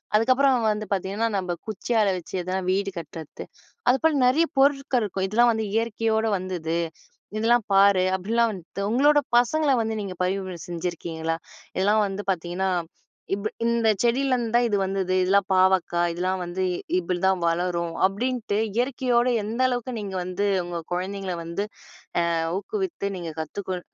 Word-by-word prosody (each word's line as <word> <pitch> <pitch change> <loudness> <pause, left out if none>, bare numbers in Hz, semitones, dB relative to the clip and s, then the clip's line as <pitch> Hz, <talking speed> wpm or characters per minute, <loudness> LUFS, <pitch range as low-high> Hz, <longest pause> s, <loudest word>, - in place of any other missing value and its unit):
அதுக்கப்புறம் 255 +1 +3
வந்து 210 0 -3
பாத்தீங்கன்னா, 200 +4 -1
நம்ப 180 -2 -2
குச்சியால 215 -1 +1
வச்சு 175 - -9
எதனா 185 +2 -2
வீடு 195 0 0
கட்றத்து. 160 -1 -9 0.4
அதுபோல 310 +5 +3
நெறைய 315 +7 +3
பொருட்கள் 275 -3 +3
இருக்கும். 195 -2 -2
"இதெல்லாம் 235 +4 +4
வந்து 220 -1 -2
இயற்கையோட 225 0 +1
வந்தது. 175 -3 -3 0.6
இதெல்லாம் 230 0 +3
பாரு" 195 -1 +6
அப்டிலாம் 225 +4 +1
வந்துட்டு 185 +1 -7
உங்களோட 290 +5 +5 0.2
பசங்கள 285 +5 +3
வந்து 225 0 -1
நீங்க 190 -2 -5
பரிவுரை 185 -1 -2
செஞ்சிருக்கீங்களா? 165 -2 -3 0.4
இதெல்லாம் 210 +3 +3
வந்து 195 +1 -5
பாத்தீங்கன்னா, 180 +2 -2 0.7
இப்ப 210 +2 -3 0.2
"இந்த 235 -1 +2
செடியிலருந்து 245 -1 +1
தான் 240 0 +4
இது 205 - +1
வந்தது. 190 -1 -1
இதெல்லாம் 195 +1 +3
பாவக்காய், 185 -2 +3
இதெல்லாம் 185 +1 -1
வந்து 180 +2 -3 0.4
இப்டி 180 0 -2
தான் 185 -2 +1
வளரும்" 170 0 -1
அப்டின்ட்டு 225 +1 -2 0.2
இயற்கையோட 245 0 +1 0.2
எந்த 230 +4 -2
அளவுக்கு 245 0 -3
நீங்க 200 -2 -5
வந்து 185 +3 -1 0.2
உங்க 175 -1 -4
குழந்தைங்கள 190 0 -3
வந்து, 170 +5 -3 0.6
ஆ - - +2 0.3
ஊக்குவித்து 345 - -3
நீங்க 170 -2 -5
கத்துக்கொ 185 +3 -4
200 Hz, 140 wpm, -25 LUFS, 185-235 Hz, 0.7 s, பாரு